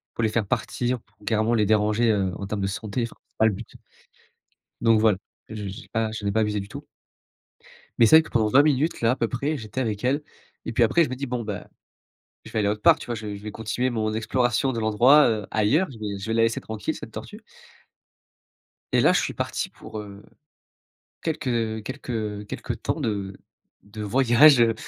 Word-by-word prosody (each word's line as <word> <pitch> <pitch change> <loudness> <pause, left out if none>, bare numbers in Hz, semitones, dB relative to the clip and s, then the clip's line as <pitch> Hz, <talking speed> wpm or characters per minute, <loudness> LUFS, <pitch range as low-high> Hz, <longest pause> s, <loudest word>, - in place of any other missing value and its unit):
pour 115 - -1
les 110 - +3
faire 110 -2 -1
partir 125 +5 -1
pour - - -36
carrément 110 +1 +2
les 105 -3 +2
déranger, 110 +2 +2
heu, 95 -3 0
en 100 - -6
termes 105 0 -3
de 95 - 0
santé 105 +4 -3
enfin 115 - -6
c'est - - -46
pas 110 - +4
le 110 - +4
but, 105 +4 -8 1.1
donc 115 -1 +4
voilà, 110 -3 +3 0.3
je - - -6
je 105 -2 -5
j'ai 95 - -9
pas, 110 -1 0
je 110 -1 -6
n'ai 100 - 0
pas 110 - +2
abusé 105 -1 0
du 100 - -5
tout. - - -9 1.1
Mais 115 - +7
c'est 160 - +8
vrai 160 - +7
que - - -12
pendant 110 -2 +2
20 135 +7 +6
minutes 150 +2 +1
là 115 +1 +3
à - - -2
peu 115 - 0
près 140 +6 -2
j'étais 110 +1 -5
avec 110 -3 -2
elle 140 +4 +1 0.4
et - - -3
puis 120 - +2
après 165 +9 +4
je - - -4
me 130 - -3
dis: 140 +2 -5
«Bon 125 -2 -3
bah, 105 -2 -6 0.8
je - - -10
vais - - -1
aller 105 - +1
autre 105 0 -2
part» - - +6
tu - - -9
vois? 120 - -2
Je 105 -2 -6
je 100 - -11
vais 105 - -5
continuer 110 +4 -2
mon 110 -3 -1
exploration 120 +3 +1
de 115 - -3
l'endroit, 120 +7 +5
heu, 110 -3 -1
ailleurs, 130 - +2
je 120 - -11
vais 105 -2 -4
je 95 - -7
vais 110 - -1
la 115 0 +3
laisser 115 0 0
tranquille 110 -1 -4
cette - - -9
tortue. - - -9 1.5
Et - - +4
là - - +5
je - - +3
suis - - -3
parti - - -3
pour, 110 - -10
heu, 100 -1 -11 1.0
quelques 115 -8 -2
quelques 110 -5 -4
quelques - - -5
temps - - -2
de 100 -3 -3 0.5
de 105 +1 -8
voyage, 130 +5 +5
heu, 115 -1 +4
110 Hz, 225 wpm, -24 LUFS, 105-125 Hz, 1.5 s, c'est